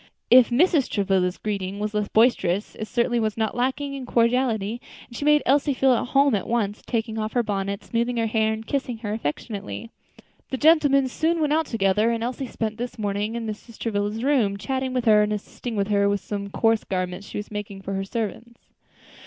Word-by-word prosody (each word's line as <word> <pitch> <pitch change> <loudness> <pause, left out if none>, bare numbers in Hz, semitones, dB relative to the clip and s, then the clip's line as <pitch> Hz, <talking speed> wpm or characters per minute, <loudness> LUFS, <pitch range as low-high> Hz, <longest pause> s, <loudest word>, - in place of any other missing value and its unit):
If 250 -1 +8
Mrs. 295 +2 +3
Travilla's 190 -3 +1
greeting 200 -2 -3
was 210 +1 -2
less 210 -1 0
boisterous, 210 -5 +2
it 220 - -6
certainly 240 +1 +1
was 215 -1 -1
not 220 -1 -1
lacking 265 +3 -1
in 265 -2 -6
cordiality, 235 -2 +1 0.3
and 235 - -13
she 285 - -4
made 300 0 +5
Elsie 280 +1 +2
feel 265 0 +4
at 245 - 0
home 275 +1 +3
at 200 - -1
once; 215 -3 -1
taking 225 -1 -2
off 215 0 -3
her 245 - +2
bonnet, 200 -1 -3
smoothing 235 +1 -1
her 230 - +1
hair, 220 0 +1
and 220 0 -5
kissing 260 -3 -2
her 210 - -2
affectionately. 215 +4 -5 0.6
The 265 - -2
gentlemen 290 -3 +4
soon 325 +6 0
went 300 -1 +1
out 320 0 +1
together, 210 0 +2
and 230 -1 -1
Elsie 255 +2 -3
spent 220 -1 -4
the 245 +1 -3
morning 205 +1 -2
in 235 -1 -3
Mrs. 220 +1 -7
Travilla's 210 0 -2
room, 245 -8 +2
chatting 260 +4 -2
with 255 -1 -1
her 215 -2 +6
and 210 0 +1
assisting 215 +3 -5
her 200 0 +2
with 200 0 0
some 200 -1 -5
coarse 225 +2 +2
garments 185 +1 -3
she - - -6
was 210 +1 -6
making 205 -2 -6
for 195 - -4
her 195 0 -1
servants. 230 +3 -5
225 Hz, 200 wpm, -24 LUFS, 205-250 Hz, 0.6 s, If